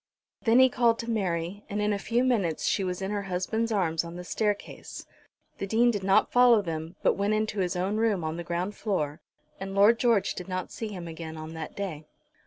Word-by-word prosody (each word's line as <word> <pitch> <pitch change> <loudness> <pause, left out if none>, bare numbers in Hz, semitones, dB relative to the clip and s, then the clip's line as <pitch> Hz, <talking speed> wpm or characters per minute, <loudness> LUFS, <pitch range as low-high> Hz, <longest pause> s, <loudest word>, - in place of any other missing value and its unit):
Then 230 +1 +5
he 260 0 +8
called 235 -2 +2
to 230 0 -4
Mary, 185 -2 -2
and 205 - -2
in 210 0 +1
a 200 - -2
few 235 +4 +1
minutes 200 -11 +1
she 195 - +1
was 180 0 -3
in 190 - -2
her 205 -1 -1
husband's 200 +5 -2
arms 170 -6 +1
on 170 0 -8
the 180 - -6
staircase. 205 +2 -3 0.5
The 195 - -3
Dean 235 +4 +4
did 205 -4 -3
not 195 +1 +3
follow 245 -4 +6
them, 160 0 -5
but - - +4
went 200 +2 0
into 215 -1 -1
his 180 0 0
own 190 +4 -1
room 215 -6 +1
on 155 0 -2
the 170 - -5
ground 175 +4 -2
floor; 155 -8 -2 0.4
and 195 0 -5
Lord 210 +4 +5
George 230 -5 +2
did 180 - -7
not 185 -1 -4
see 225 - -5
him 185 -5 -7
again 160 -1 -7
on 155 +1 -7
that 160 -1 -7
day. 170 -7 -5
195 Hz, 220 wpm, -28 LUFS, 175-220 Hz, 0.5 s, he